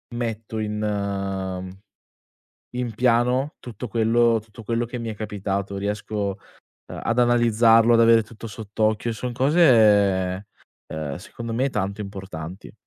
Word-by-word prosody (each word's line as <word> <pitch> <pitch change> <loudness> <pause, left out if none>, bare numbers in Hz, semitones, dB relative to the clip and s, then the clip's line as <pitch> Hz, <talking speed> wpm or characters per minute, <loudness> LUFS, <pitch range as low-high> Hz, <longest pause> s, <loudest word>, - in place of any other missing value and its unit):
metto 115 -2 -4
in 100 -3 -3 1.0
in 125 -2 -3
piano 125 +4 +2
tutto 120 0 -7
quello 115 +1 +3
tutto 110 +1 -13
quello 115 +2 0
che 120 +1 -6
mi 115 -1 -5
è - - -5
capitato. 100 -2 -3
Riesco 100 0 -3 0.5
ehm, - - -6
ad 115 - -1
analizzarlo, 120 -1 +5
ad 115 - +5
avere 115 0 +6
tutto 110 +1 -12
sott'occhio, 110 +1 -1
son 125 +3 -4
cose, 105 - +4 0.5
uhm, 75 -3 -4
secondo 115 +6 -7
me 130 +4 +1
tanto 100 +1 -2
importanti. 95 -3 -8
110 Hz, 125 wpm, -23 LUFS, 100-115 Hz, 1.0 s, avere